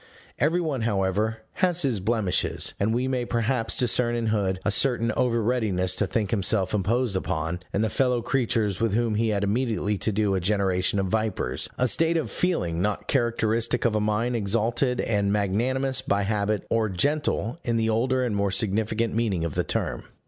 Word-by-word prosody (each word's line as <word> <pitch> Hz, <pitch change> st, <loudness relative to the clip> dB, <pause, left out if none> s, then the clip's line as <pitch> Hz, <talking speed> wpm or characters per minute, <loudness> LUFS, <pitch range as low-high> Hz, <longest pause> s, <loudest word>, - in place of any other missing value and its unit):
Every 160 Hz, +6 st, +2 dB
one, 150 Hz, -7 st, -2 dB
however, 105 Hz, +1 st, 0 dB, 0.2 s
has 175 Hz, -2 st, +2 dB
his 125 Hz, -7 st, +1 dB
blemishes; 105 Hz, -2 st, 0 dB
and 100 Hz, +3 st, +1 dB
we 125 Hz, +3 st, 0 dB
may 130 Hz, -2 st, -1 dB
perhaps 120 Hz, 0 st, -1 dB
discern 120 Hz, -1 st, +2 dB
in 115 Hz, -1 st, -2 dB
Hood 95 Hz, -3 st, 0 dB
a 105 Hz, -, +2 dB
certain 115 Hz, +1 st, +1 dB
over 115 Hz, 0 st, 0 dB
readiness 100 Hz, -6 st, +1 dB
to 100 Hz, -, +1 dB
think 105 Hz, 0 st, -1 dB
himself 95 Hz, -2 st, +1 dB
imposed 110 Hz, +2 st, 0 dB
upon, 80 Hz, -1 st, -2 dB
and 100 Hz, -, 0 dB
the 110 Hz, -, +1 dB
fellow 125 Hz, -3 st, +1 dB
creatures 115 Hz, -7 st, 0 dB
with 115 Hz, -3 st, +1 dB
whom 115 Hz, -1 st, +1 dB
he 110 Hz, +1 st, +1 dB
had 100 Hz, -1 st, 0 dB
immediately 105 Hz, -2 st, -1 dB
to 110 Hz, -, 0 dB
do 105 Hz, -1 st, +1 dB
a 95 Hz, -, +1 dB
generation 95 Hz, 0 st, +1 dB
of 95 Hz, -, +1 dB
vipers 110 Hz, 0 st, -2 dB
a 125 Hz, -, +2 dB
state 165 Hz, +6 st, +2 dB
of 160 Hz, -, -3 dB
feeling 90 Hz, -, -1 dB
not 105 Hz, +1 st, -2 dB
characteristic 115 Hz, -2 st, +1 dB
of 115 Hz, -, +2 dB
a 105 Hz, -, +1 dB
mind 110 Hz, +4 st, 0 dB
exalted 115 Hz, +4 st, 0 dB
and 100 Hz, -3 st, 0 dB
magnanimous 130 Hz, +7 st, 0 dB
by 100 Hz, -6 st, 0 dB
habit, 105 Hz, 0 st, -1 dB
or 110 Hz, -2 st, +1 dB
"gentle" 140 Hz, -, -1 dB
in 115 Hz, -1 st, 0 dB
the 110 Hz, 0 st, +1 dB
older 130 Hz, +3 st, +1 dB
and 115 Hz, -4 st, -2 dB
more 100 Hz, 0 st, +1 dB
significant 110 Hz, +3 st, 0 dB
meaning 105 Hz, -7 st, 0 dB
of 80 Hz, -, -3 dB
the -, -, 0 dB
term. -, -, -3 dB
110 Hz, 185 wpm, -25 LUFS, 100-120 Hz, 0.2 s, Every